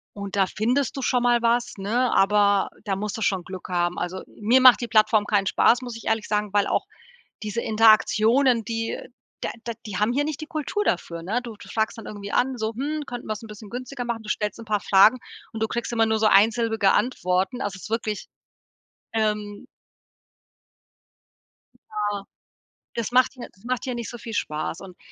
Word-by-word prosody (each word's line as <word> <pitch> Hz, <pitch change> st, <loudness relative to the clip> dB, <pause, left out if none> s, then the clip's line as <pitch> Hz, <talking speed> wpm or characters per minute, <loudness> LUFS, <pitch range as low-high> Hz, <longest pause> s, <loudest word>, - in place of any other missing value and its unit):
Und 200 Hz, -1 st, -6 dB
da 195 Hz, -1 st, +4 dB
findest 250 Hz, +9 st, 0 dB
du 270 Hz, -, -4 dB
schon 250 Hz, -1 st, +1 dB
mal 240 Hz, -1 st, +3 dB
was, 240 Hz, +1 st, +1 dB
ne, 235 Hz, +6 st, 0 dB
aber 200 Hz, 0 st, +3 dB, 0.2 s
da 195 Hz, -2 st, -1 dB
musst 210 Hz, +1 st, -4 dB
du 225 Hz, -, -5 dB
schon 190 Hz, -3 st, 0 dB
Glück 185 Hz, 0 st, -8 dB
haben, 175 Hz, -1 st, 0 dB
also, 180 Hz, +2 st, -4 dB
mir 230 Hz, +5 st, +3 dB
macht 255 Hz, -1 st, +8 dB
die 240 Hz, -, -2 dB
Plattform 215 Hz, -1 st, +4 dB
keinen 205 Hz, -2 st, +1 dB
Spaß, 240 Hz, +5 st, +4 dB
muss 245 Hz, -2 st, -6 dB
ich 230 Hz, -, -11 dB
ehrlich 220 Hz, -1 st, 0 dB
sagen, 210 Hz, -1 st, -1 dB
weil 205 Hz, -1 st, +3 dB
auch -, -, 0 dB, 0.6 s
diese 215 Hz, +2 st, -3 dB
Interaktionen, 225 Hz, +3 st, +4 dB
die 225 Hz, +1 st, -3 dB, 0.4 s
da -, -, -3 dB
da 235 Hz, -, -3 dB
die 205 Hz, -3 st, -5 dB
haben 210 Hz, +3 st, +2 dB
hier 285 Hz, +3 st, +1 dB
nicht 305 Hz, -1 st, -4 dB
die 310 Hz, -, -6 dB
Kultur 310 Hz, +7 st, -2 dB
dafür, 170 Hz, -, -2 dB
ne? 210 Hz, +8 st, -1 dB
Du 235 Hz, -3 st, -8 dB
du -, -, -13 dB
fragst 220 Hz, +1 st, -1 dB
dann 225 Hz, -, -9 dB
irgendwie 205 Hz, -1 st, -7 dB
an, 260 Hz, +1 st, +1 dB
so: 220 Hz, 0 st, -2 dB
„Hm, 295 Hz, +5 st, -3 dB
könnten 245 Hz, -2 st, -7 dB
wir's 215 Hz, -1 st, -4 dB
bisschen 210 Hz, -2 st, -11 dB
günstiger 250 Hz, +1 st, -5 dB
machen?“ 235 Hz, -2 st, -3 dB
Du 215 Hz, -, -12 dB
stellst 210 Hz, +1 st, -2 dB
'n -, -, -9 dB
paar 210 Hz, -1 st, +1 dB
Fragen 210 Hz, +5 st, +5 dB, 0.3 s
und 220 Hz, -, -6 dB
du -, -, +3 dB
kriegst 235 Hz, +1 st, -3 dB
immer 225 Hz, -1 st, +3 dB
nur 220 Hz, 0 st, +1 dB
so 220 Hz, -, +3 dB
einsilbige 220 Hz, 0 st, +4 dB
Antworten, 190 Hz, 0 st, 0 dB
also 200 Hz, -1 st, -3 dB
es 190 Hz, -, -13 dB
ist -, -, -8 dB
wirklich 220 Hz, -2 st, -2 dB, 0.9 s
Ähm. 210 Hz, -2 st, -2 dB, 2.2 s
Ja, 205 Hz, -2 st, -2 dB, 0.7 s
das 235 Hz, 0 st, -2 dB
macht 255 Hz, +1 st, +4 dB
hier 255 Hz, -3 st, -9 dB
das 190 Hz, -, -25 dB
macht 250 Hz, 0 st, -2 dB
hier 255 Hz, -2 st, -3 dB
nicht 235 Hz, -2 st, -5 dB
so 240 Hz, -, -8 dB
viel 225 Hz, 0 st, -8 dB
Spaß 155 Hz, -2 st, -3 dB
und 185 Hz, -2 st, -11 dB
220 Hz, 200 wpm, -24 LUFS, 205-240 Hz, 2.2 s, macht